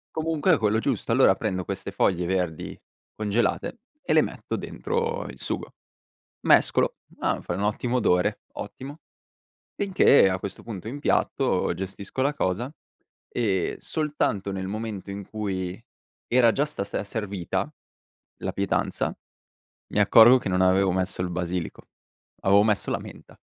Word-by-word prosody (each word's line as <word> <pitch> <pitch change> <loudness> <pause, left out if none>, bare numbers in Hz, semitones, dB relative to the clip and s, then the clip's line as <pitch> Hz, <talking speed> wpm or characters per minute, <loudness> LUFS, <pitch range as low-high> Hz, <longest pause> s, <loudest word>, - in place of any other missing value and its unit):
Comunque 160 +2 +2
è - - +4
quello 110 0 +2
giusto. 120 -3 -1
Allora 115 -5 +5
prendo 95 -4 -2
queste - - -5
foglie 90 -2 +1
verdi 90 -3 -2 0.4
congelate 110 - -1 0.2
e - - 0
le - - +6
metto - - -4
dentro 470 +2 -2
il - - -10
sugo. - - -4 0.7
Mescolo: - - +3 0.2
"Ah, - - 0
fai 85 - -3
un 100 - -2
ottimo 120 +4 0
odore, 105 -2 +2
ottimo!" 135 +8 -8 0.8
Finché 190 - +5
a 95 0 -1
questo 100 0 -7
punto 110 -2 -7
impiatto, 145 +4 +1
gestisco 100 +6 -5
la 145 +2 +1
cosa, 120 +3 -1 0.6
ehm, 100 -7 0
soltanto 145 - -1
nel 95 -1 -3
momento 105 -2 -5
in 100 -1 -7
cui 95 -3 -3 0.5
era 120 -2 +4
già 145 - +1
sta 150 -10 -4
se 100 - -3
servita 100 -4 -3 0.7
la - - -2
pietanza, 100 0 -1 0.8
mi 105 - +2
accorgo 115 +5 +8
che 100 - -4
non 90 0 +2
avevo 95 0 +4
messo 95 -1 -1
il 90 - -1
basilico, 90 -1 -4 0.5
avevo 100 +1 +5
messo 105 -2 +1
la - - +1
menta. - - -13
105 Hz, 145 wpm, -25 LUFS, 95-125 Hz, 0.8 s, accorgo